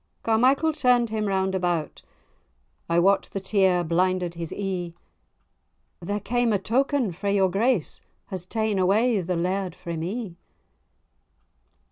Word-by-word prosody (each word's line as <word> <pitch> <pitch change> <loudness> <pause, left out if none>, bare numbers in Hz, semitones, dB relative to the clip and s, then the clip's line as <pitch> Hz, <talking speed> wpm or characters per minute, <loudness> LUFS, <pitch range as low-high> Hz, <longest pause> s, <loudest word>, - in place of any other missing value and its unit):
Carmichael 260 +8 +3
turn'd 250 -5 +2
him 215 -1 -1
round 190 -1 0
about 175 -4 -2 0.9
(I 170 - +2
wot 195 +3 +3
the 195 - -2
tear 190 -2 +2
blinded 180 +1 0
his 170 -1 -6
ee), 180 -4 -4 1.0
"There 205 +4 -3
came 240 +3 0
a 205 - +3
token 250 +2 0
frae 200 +4 -2
your 190 -2 +3
grace, 215 - 0 0.3
Has 185 -2 -4
ta'en 220 -2 -1
away 210 +4 +3
the 180 +1 -2
laird 180 +1 -2
frae 170 -2 -6
me." 180 +2 -4
195 Hz, 130 wpm, -25 LUFS, 180-220 Hz, 1.0 s, Carmichael